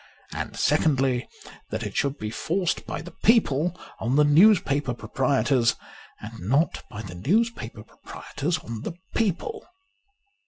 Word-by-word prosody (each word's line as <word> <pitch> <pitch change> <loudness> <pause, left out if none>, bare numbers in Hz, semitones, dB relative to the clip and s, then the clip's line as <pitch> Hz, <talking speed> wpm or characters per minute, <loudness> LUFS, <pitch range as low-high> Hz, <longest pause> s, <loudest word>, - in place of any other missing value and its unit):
And - - -5
secondly, 135 -3 +2 0.4
that - - -3
it - - -5
should 140 +1 0
be 105 -4 -4
forced 175 - -1
by - - -4
the 175 - -10
people 180 - +3 0.2
on 120 +4 0
the 150 - +6
newspaper 145 - +4
proprietors, 130 -1 +1 0.4
and 115 +2 -9
not 135 - +1
by 105 +2 -7
the 95 - -8
newspaper 130 - -1
proprietors 150 +7 -4
on 115 -1 -7
the - - -4 0.2
people. 225 - -1
140 Hz, 130 wpm, -25 LUFS, 120-175 Hz, 0.4 s, the